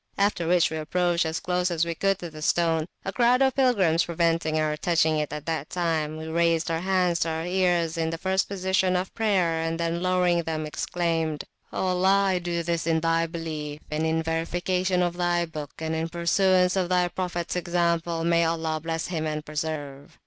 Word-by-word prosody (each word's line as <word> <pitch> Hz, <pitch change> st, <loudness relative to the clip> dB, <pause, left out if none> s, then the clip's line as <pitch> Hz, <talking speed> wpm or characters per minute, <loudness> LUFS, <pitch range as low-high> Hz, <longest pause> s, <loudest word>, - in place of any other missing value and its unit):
After 200 Hz, -4 st, +1 dB
which 175 Hz, -1 st, +3 dB
we 160 Hz, -, -3 dB
approached 175 Hz, +2 st, 0 dB
as 160 Hz, +1 st, -2 dB
close 180 Hz, 0 st, 0 dB
as 170 Hz, -1 st, 0 dB
we 170 Hz, -, -2 dB
could 195 Hz, +3 st, +1 dB
to 175 Hz, -3 st, -7 dB
the 155 Hz, 0 st, -10 dB
stone. 165 Hz, 0 st, +1 dB, 0.2 s
A 195 Hz, -, -3 dB
crowd 250 Hz, +2 st, +4 dB
of 265 Hz, -1 st, +3 dB
pilgrims 195 Hz, -11 st, +3 dB
preventing 165 Hz, -2 st, 0 dB
our 155 Hz, -1 st, 0 dB
touching 160 Hz, -1 st, +2 dB
it 150 Hz, -, -2 dB
that 150 Hz, 0 st, -4 dB
time, 160 Hz, -3 st, -1 dB
we 160 Hz, -, -6 dB
raised 165 Hz, +1 st, +1 dB
our 165 Hz, -, 0 dB
hands 180 Hz, -2 st, +1 dB
to 165 Hz, -, 0 dB
our 160 Hz, +1 st, -3 dB
ears, 175 Hz, -2 st, +1 dB
in 160 Hz, 0 st, 0 dB
the 165 Hz, -, -3 dB
first 190 Hz, +2 st, 0 dB
position 190 Hz, -1 st, +1 dB
of 180 Hz, +1 st, -2 dB
prayer, 185 Hz, -7 st, +1 dB
and 165 Hz, 0 st, -2 dB
then 170 Hz, 0 st, -1 dB
lowering 180 Hz, -1 st, +2 dB
them, 160 Hz, -1 st, -3 dB
exclaimed, 165 Hz, -1 st, -2 dB, 0.3 s
O -, -, -2 dB
Allah 190 Hz, +2 st, +3 dB
(I 185 Hz, -1 st, +1 dB
do 175 Hz, -1 st, -2 dB
this), 170 Hz, -1 st, -2 dB
in 160 Hz, -1 st, +2 dB
Thy 165 Hz, 0 st, +1 dB
Belief, 155 Hz, -3 st, -5 dB
and 155 Hz, +1 st, -1 dB
in 160 Hz, 0 st, +1 dB
verification 180 Hz, +3 st, 0 dB
of 175 Hz, 0 st, -2 dB
Thy 175 Hz, -1 st, +1 dB
Book, 155 Hz, -3 st, -7 dB
and 160 Hz, 0 st, -3 dB
in 160 Hz, +1 st, -2 dB
Pursuance 180 Hz, +2 st, +2 dB
of 185 Hz, -2 st, 0 dB
Thy 180 Hz, -1 st, +3 dB
Prophets 175 Hz, -1 st, -3 dB
Examplemay 170 Hz, -1 st, +1 dB
Allah 160 Hz, -1 st, -1 dB
bless 165 Hz, 0 st, -3 dB
Him 160 Hz, -3 st, -2 dB
and 155 Hz, 0 st, -3 dB
preserve! 150 Hz, -2 st, -5 dB
170 Hz, 195 wpm, -26 LUFS, 160-180 Hz, 0.3 s, crowd